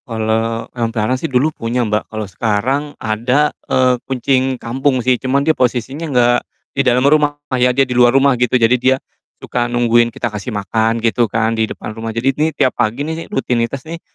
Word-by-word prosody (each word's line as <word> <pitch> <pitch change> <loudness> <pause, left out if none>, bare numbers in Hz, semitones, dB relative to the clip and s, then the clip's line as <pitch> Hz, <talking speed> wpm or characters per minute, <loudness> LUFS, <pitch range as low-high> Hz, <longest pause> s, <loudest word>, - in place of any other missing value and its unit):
Kalau 115 0 -1
hewan 115 -2 -1
peliharaan 115 +2 -1
sih 165 - -2
dulu 135 +5 +1
punya, 120 0 -2
Mbak. 105 0 -2
Kalau 110 -1 -4
sekarang 110 +8 -1
ada, 125 +7 0 0.2
eee, 130 -1 +3
kucing 130 0 0
kampung 130 +3 -1
sih, 125 -1 +2
cuma 135 +2 0
dia 160 - +4
posisinya 130 +5 -2
enggak 120 -2 +3 0.3
di 135 - +1
dalam 125 0 +2
rumah 145 0 +3 0.2
ya, 125 0 +3
dia 135 +2 +2
di 125 - -4
luar 120 0 +5
rumah 140 0 +4
gitu. 125 +1 +1
Jadi 115 +1 +4
dia, 130 +1 +4 0.5
suka 120 -1 -2
nungguin 120 -1 +3
kita 120 - -3
kasih 105 +3 -5
makan 110 +3 0
gitu 115 0 +1
kan, 110 +2 0
di 110 -1 0
depan 110 - -7
rumah. 115 +1 -6
Jadi 125 +4 0
ini 155 +4 +1
tiap 130 - 0
pagi 120 +4 0
nih, 160 +1 -5
rutinitas 125 +1 -2
nih, 165 +1 -7
125 Hz, 195 wpm, -17 LUFS, 115-135 Hz, 0.5 s, luar